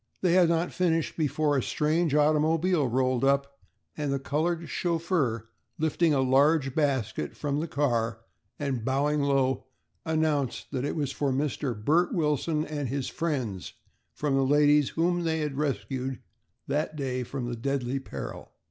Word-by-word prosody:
They 180 Hz, -2 st, +3 dB
had 180 Hz, -2 st, +5 dB
not 170 Hz, +1 st, 0 dB
finished 165 Hz, -3 st, 0 dB
before 150 Hz, -1 st, +1 dB
a 135 Hz, -, +2 dB
strange 155 Hz, +3 st, +1 dB
automobile 155 Hz, +1 st, +3 dB
rolled 130 Hz, +1 st, +1 dB
up 140 Hz, 0 st, +1 dB, 0.4 s
and 145 Hz, -2 st, -2 dB
the 140 Hz, -, +1 dB
colored 160 Hz, +5 st, -1 dB
chauffeur 165 Hz, -, -1 dB, 0.3 s
lifting 160 Hz, +1 st, +2 dB
a 140 Hz, -2 st, +3 dB
large 135 Hz, +1 st, +3 dB
basket 135 Hz, -8 st, -1 dB
from 145 Hz, -1 st, -1 dB
the 165 Hz, -, -2 dB
car 120 Hz, -6 st, 0 dB, 0.4 s
and 135 Hz, -5 st, -2 dB
bowing 145 Hz, +4 st, +1 dB
low, 135 Hz, -2 st, +1 dB, 0.4 s
announced 155 Hz, -5 st, -1 dB
that 130 Hz, -1 st, -2 dB
it -, -, -2 dB
was 145 Hz, -4 st, -1 dB
for 140 Hz, -1 st, -1 dB
Mr. 135 Hz, -3 st, -2 dB
Bert 170 Hz, +4 st, +3 dB
Wilson 155 Hz, -1 st, 0 dB
and 145 Hz, -4 st, -3 dB
his 135 Hz, 0 st, -2 dB
friends 130 Hz, -, -3 dB, 0.4 s
from 145 Hz, -2 st, -2 dB
the 135 Hz, 0 st, +3 dB
ladies 145 Hz, +1 st, +4 dB
whom 175 Hz, +2 st, +1 dB
they 160 Hz, -1 st, 0 dB
had 150 Hz, -2 st, -2 dB
rescued 135 Hz, -3 st, -2 dB, 0.5 s
that 155 Hz, +1 st, -1 dB
day 130 Hz, -3 st, -2 dB
from 125 Hz, -1 st, -4 dB
deadly 135 Hz, -1 st, -1 dB
peril. 135 Hz, -, -7 dB
145 Hz, 150 wpm, -28 LUFS, 135-155 Hz, 0.5 s, had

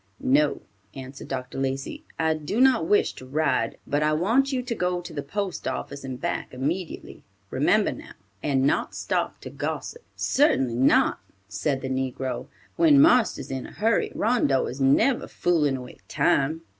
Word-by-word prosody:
"No," 145 Hz, +3 st, +2 dB, 0.3 s
answered 135 Hz, 0 st, -9 dB
Dr. 130 Hz, 0 st, -5 dB
Lacey, 135 Hz, -, -3 dB
"I 160 Hz, -1 st, +2 dB
do 155 Hz, +8 st, -3 dB
not 255 Hz, -10 st, +4 dB
wish 205 Hz, -, +3 dB
to -, -, -12 dB
ride, 135 Hz, -5 st, 0 dB
but 145 Hz, +1 st, 0 dB
I 150 Hz, 0 st, +2 dB
want 230 Hz, -, +2 dB
you 255 Hz, -2 st, -1 dB
to 245 Hz, -1 st, -3 dB
go 180 Hz, -4 st, -1 dB
to 175 Hz, -1 st, -9 dB
the 145 Hz, -, -3 dB
post 190 Hz, +6 st, -4 dB
office 140 Hz, 0 st, -4 dB
and 130 Hz, -2 st, -6 dB
back -, -, -3 dB
immediately; 160 Hz, +7 st, -4 dB, 0.3 s
remember -, -, +2 dB
now, -, -, -10 dB, 0.3 s
and 135 Hz, -2 st, +1 dB
not 140 Hz, -, +1 dB
stop -, -, -2 dB
to -, -, -8 dB
gossip." 470 Hz, -, -4 dB
"Certainly 135 Hz, -, +2 dB
not," 130 Hz, -, +3 dB, 0.3 s
said 135 Hz, +5 st, -2 dB
the 130 Hz, -, -4 dB
negro. 130 Hz, -1 st, -3 dB, 0.3 s
"When 315 Hz, -4 st, +6 dB
marster's 250 Hz, -, +4 dB
in 130 Hz, -1 st, -4 dB
a -, -, -13 dB
hurry, 225 Hz, +2 st, +1 dB
Rondeau 210 Hz, -, +2 dB
is 135 Hz, +2 st, -6 dB
never 220 Hz, -, +3 dB
foolin' 150 Hz, -6 st, +1 dB
away 125 Hz, -1 st, -10 dB
time." 155 Hz, +4 st, +1 dB
150 Hz, 165 wpm, -25 LUFS, 135-210 Hz, 0.3 s, When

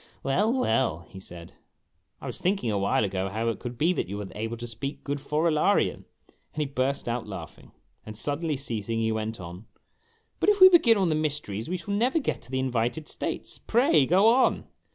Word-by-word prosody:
" -, -, -34 dB
"Well, 200 Hz, +12 st, +2 dB
well," 115 Hz, -, 0 dB
he 95 Hz, -, -10 dB
said; 85 Hz, -3 st, -11 dB, 0.3 s
" -, -, -46 dB
I -, -, -8 dB
was -, -, -6 dB
thinking 185 Hz, -, 0 dB
a 105 Hz, -, 0 dB
while 100 Hz, +2 st, +1 dB
ago 95 Hz, -1 st, -2 dB
how 110 Hz, +3 st, -1 dB
it 115 Hz, -, -3 dB
could 120 Hz, -1 st, -7 dB
be 165 Hz, +7 st, +2 dB
that 165 Hz, -, -3 dB
you 100 Hz, -, -4 dB
were 105 Hz, -, -5 dB
able 115 Hz, +2 st, -4 dB
to 120 Hz, -, -6 dB
speak 120 Hz, +5 st, -6 dB
good 145 Hz, 0 st, -3 dB
Forolarian 155 Hz, +1 st, +1 dB, 0.2 s
"; -, -, -33 dB
and -, -, -29 dB
he -, -, +1 dB
burst 135 Hz, 0 st, -1 dB
out 120 Hz, -1 st, -2 dB
laughing. 90 Hz, -6 st, -9 dB, 0.3 s
Then 110 Hz, -, -9 dB
suddenly 150 Hz, +5 st, -1 dB
ceasing 115 Hz, -4 st, -3 dB
he 110 Hz, 0 st, +1 dB
went 110 Hz, 0 st, -3 dB
on, 90 Hz, +3 st, -9 dB, 0.4 s
" 455 Hz, 0 st, -41 dB
But -, -, +3 dB
if 415 Hz, -1 st, +3 dB
we 375 Hz, 0 st, +11 dB
begin 290 Hz, -, +5 dB
on 190 Hz, -3 st, +2 dB
the -, -, +2 dB
mysteries 145 Hz, -8 st, -2 dB
we 185 Hz, -, -1 dB
shall 200 Hz, +4 st, -5 dB
never 245 Hz, +9 st, +2 dB
get 310 Hz, -, -1 dB
to 120 Hz, -, -14 dB
the 130 Hz, -, -2 dB
invited 130 Hz, +3 st, -1 dB
states. -, -, -5 dB
Pray 220 Hz, -, +3 dB
go 190 Hz, +5 st, +5 dB
on." 255 Hz, +3 st, +3 dB
130 Hz, 220 wpm, -27 LUFS, 110-175 Hz, 0.4 s, we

